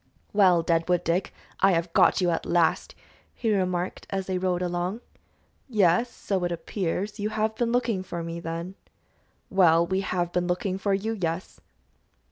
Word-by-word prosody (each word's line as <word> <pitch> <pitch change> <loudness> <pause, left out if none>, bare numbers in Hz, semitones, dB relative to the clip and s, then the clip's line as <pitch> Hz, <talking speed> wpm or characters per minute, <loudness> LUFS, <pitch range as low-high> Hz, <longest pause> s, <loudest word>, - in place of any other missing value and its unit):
"Well, 185 -5 +5
Deadwood 170 +1 +1
Dick, 170 +3 0 0.3
I 195 -1 +5
have 165 0 -1
got - - +4
you 175 -1 +2
at 165 - -1
last," 170 -1 +1 0.4
he 225 -3 0
remarked, 185 -2 -1
as 195 -1 -2
they 185 -1 -2
rode 180 -1 0
along. 180 +5 -2 0.7
"Yes, 210 +1 +3
so 195 -5 -2
it 175 - -1
appears. 195 +4 -3
You 210 +1 -1
have 220 0 0
been 235 +1 -1
looking 235 -5 +1
for 175 -2 -5
me, 165 0 -5
then?" 170 +2 -5 0.8
"Well, 170 -3 +5
we 190 +2 0
have 175 -2 -1
been 180 0 0
looking 185 +1 -1
for 200 0 +1
you, 220 +3 -2
yes." 165 +2 -3
185 Hz, 165 wpm, -26 LUFS, 170-200 Hz, 0.8 s, Well